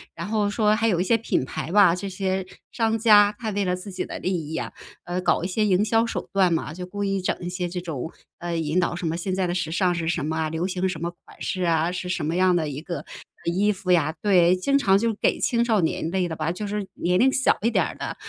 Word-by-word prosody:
然 170 - -5
后 210 -1 0
说 210 0 +2
还 225 0 +1
有 180 -5 +2
一 - - +2
些 225 +4 +3
品 220 - -1
牌 160 +6 -5
吧， 195 -5 +6
这 195 +2 -4
些 190 0 -2 0.3
商 225 -1 +1
家， 210 -2 +6
他 225 -3 -4
为 205 -1 -1
了 180 0 +1
自 185 +2 -8
己 185 - -3
的 - - -6
利 185 - -2
益 160 - -5
啊， - - -3 0.3
呃， 175 +1 -3
搞 180 - +1
一 - - 0
些 215 +3 0
营 195 -1 +3
销 225 +2 +2
手 - - -4
段 185 -3 +3
嘛， 155 -1 -2
就 180 +1 -6
故 205 +2 -5
意 195 -1 0
整 185 - -1
一 175 - -4
些 180 -1 -3
这 180 0 -5
种， 160 -3 -5 0.3
呃， 170 -1 -4
引 160 +2 0
导 175 -1 0
什 175 0 -5
么， 165 +1 -1
现 185 +1 -2
在 190 - 0
的 175 - -1
时 170 -3 -2
尚 180 -1 +2
是 165 -2 -3
什 165 -3 -1
么 160 +1 -2
啊， 160 -1 0
流 160 +2 -2
行 185 0 -1
什 165 -4 -4
么 170 0 -2
款 - - -17
式 185 -2 -2
啊， 165 0 +2
是 180 0 -4
什 180 -4 -2
么 165 +3 -1
样 185 -1 +4
的 155 -3 0
一 145 +1 -6
个 170 -3 -5 0.5
呃 170 - +1
衣 205 +3 +2
服 190 -1 -3
呀。 165 -3 +3
对， 185 -3 +4
经 275 +10 +1
常 195 -8 +4
就 230 +2 +1
给 - - +1
青 235 -1 +2
少 220 -5 +2
年 160 0 -1
类 185 -2 0
的 160 - -4
吧， 155 +1 -2
就 180 +4 -5
是 205 -1 -3
年 180 +1 +1
龄 265 +1 +5
小 265 - +2
一 230 - +2
点 - - +3
儿 - - -6
的， - - -5
185 Hz, 300 characters per minute, -24 LUFS, 170-205 Hz, 0.5 s, 吧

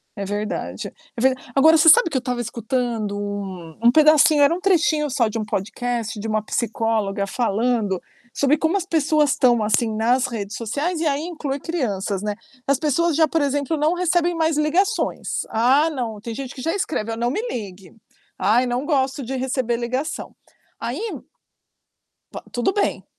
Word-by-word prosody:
É 200 - -4
verdade, 205 +2 -4 0.3
é 230 - -4
ve 265 +1 +4 0.2
agora 320 +4 +6
você 310 - +4
sabe 465 +5 +7
que 285 - -1
eu - - +2
estava 245 -1 -3
escutando 230 -2 -2
um 195 -5 -6
um 235 - +7
pedacinho, 305 0 +5
era 285 - +5
um 345 - -3
trechinho 335 -5 +2
só 250 -4 +1
de 225 - -3
um 215 - -3
podcast, 225 +2 -3
de 215 - -4
uma 215 0 0
psicóloga 220 -3 -1
falando 220 -2 0 0.3
sobre 280 +3 +2
como 320 +4 0
as 385 -3 0
pessoas, 310 -4 +2
estão, 245 -6 +3
assim, 215 +1 +1
nas 245 +4 +2
redes 215 -4 -5
sociais, 290 - -2
e 325 - 0
aí 285 0 0
inclui 300 -5 -4
crianças, 205 - -2
né. 210 0 -2 0.3
As 275 - +3
pessoas 310 +3 +1
já, 320 +1 +5
por 320 +1 0
exemplo, 285 +2 0
não 305 +3 +2
recebem 350 -1 +1
mais 320 -2 +1
ligações, 365 +9 0
ah, 265 +8 +3
não, 240 -8 -4
tem 230 +2 -6
gente 270 0 -6
que 255 - -9
já 325 +5 -1
escreve: 260 - -2
"Ó, - - -3
não 240 +1 0
me 425 - -1
ligue. 195 - -7 0.4
Ai, 215 +7 +3
não 245 +2 -2
gosto 270 -2 0
de 260 +3 -4
receber 255 -2 -1
ligação". 255 +6 -4 0.4
Aí - - -4 1.3
to - - -7
tudo 245 +9 0
bem. 410 - -1
255 Hz, 180 wpm, -22 LUFS, 220-305 Hz, 1.3 s, sabe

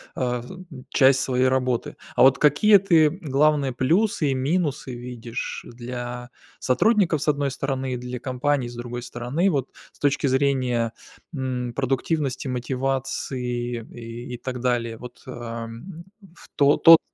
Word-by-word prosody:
э, - - -6 0.3
м, 185 +6 -11 0.2
часть 135 -1 +5
своей 130 -1 +2
работы. 130 -2 0 0.2
А - - +2
вот 135 +1 +7
какие 150 +9 +6
ты 170 -5 +4
главные 150 -4 +1
плюсы 160 - +2
и - - +1
минусы 140 -1 -1
видишь 120 -1 -6
для 120 0 -6 0.3
сотрудников 175 - +2
с - - -6
одной 145 -1 +1
стороны, 135 -1 -3
и - - -2
для 125 0 -6
компаний 130 0 -1
с 120 - -10
другой 120 0 -5
стороны? 125 +9 -1
Вот 140 -5 -1 0.2
с - - -26
точки 145 0 +1
зрения, 130 -4 +1 0.4
м, 125 -3 -3
продуктивности, 135 +2 -1
мотивации 125 -2 -2
и 120 +1 -8
и - - -8
так 125 0 -5
далее, 120 -2 0
вот, 125 +1 -11
а, 120 -2 -6
м, 165 +10 -10 0.3
в - - -15
тот 145 0 +3
тот 165 -1 +10
130 Hz, 145 wpm, -24 LUFS, 120-145 Hz, 0.4 s, тот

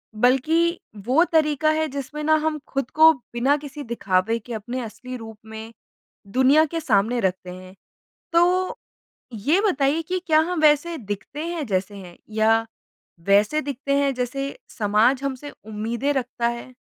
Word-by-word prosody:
बल्कि 315 +9 +2 0.3
वो 270 +7 +4
तरीका 310 -1 +2
है 315 0 0
जिसमें 280 +2 -6
ना 315 +1 +4
हम 310 -1 -1
खुद 275 -2 -3
को 320 +1 +8 0.2
बिना 265 +5 +2
किसी 290 0 -8
दिखावे 225 -2 0
के 235 +2 -9
अपने 240 +4 -4
असली 255 +3 -8
रूप 225 -2 -10
में 220 +1 -9 0.6
दुनिया 270 +5 +5
के 330 +2 -4
सामने 235 -4 +1
रखते 185 -3 -2
हैं। 185 +1 -12 0.6
तो, 360 +2 +2 0.5
ये 280 - +1
बताइए 285 +2 +1
कि 365 +3 -2
क्या 315 -2 +5
हम 345 +1 -1
वैसे 310 +2 +3
दिखते 210 +8 -6
हैं 340 -4 -3
जैसे 195 -1 -2
हैं, 180 -3 -11
या 225 +1 +2 0.6
वैसे 210 +10 +4
दिखते 280 0 -2
हैं 280 -1 +2
जैसे 275 +3 -3 0.2
समाज 220 +5 +3
हमसे 275 +1 -4
उम्मीदें 225 +6 -2
रखता 245 -2 -1
है? 235 +2 -6
260 Hz, 155 wpm, -23 LUFS, 225-305 Hz, 0.6 s, को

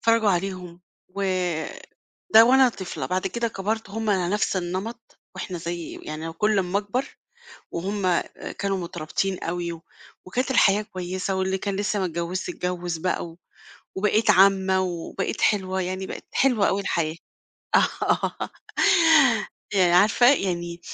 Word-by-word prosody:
نتفرجوا 230 -2 +3
عليهم 180 -1 -3 0.3
و 200 +2 -5 1.1
ده 225 - +10
وأنا 260 +1 +6
طفلة، 190 -6 -5
بعد 185 0 -1
كده 235 -1 -1
كبرت 210 +1 -3
هُم 220 0 -2
على 185 -3 +1
نفْس 205 -2 0
النمط 195 +7 -5 0.2
وإحنا 185 -2 -5
زي 170 0 -5
يعني 155 +2 -6
كلّ 210 +5 +1
أمّا 190 +1 +1
أكبر 210 +6 -2 0.7
وهُم 185 0 0 0.4
كانوا 195 -1 0
مترابطين 180 +2 -3
أوي 170 -1 -4 0.4
وكانت 255 +8 -1
الحياة 205 -4 +4
كويسة 185 -1 -4
واللي 190 0 0
كان 200 0 -3
لسّه 205 +1 -1
ما 190 - 0
اتجوّزّش 170 +2 -3
اتجوّز 180 -1 -3
بقى 180 +2 -1
و 165 0 -13 0.6
وبقيت 210 +2 +3
عمّة 190 0 +4
وبقيت 175 -3 -3
حلوة 190 -2 +1
يعني 185 +1 -3
بقِت - - -8
حلوة 245 -7 +3
أوي 200 +1 0
الحياة، 165 -4 -1 0.6
آه - - 0 1.2
يعني 180 -3 +4
عارفة 210 +7 +5
يعني 175 -5 -3
190 Hz, 135 wpm, -24 LUFS, 175-205 Hz, 1.2 s, ده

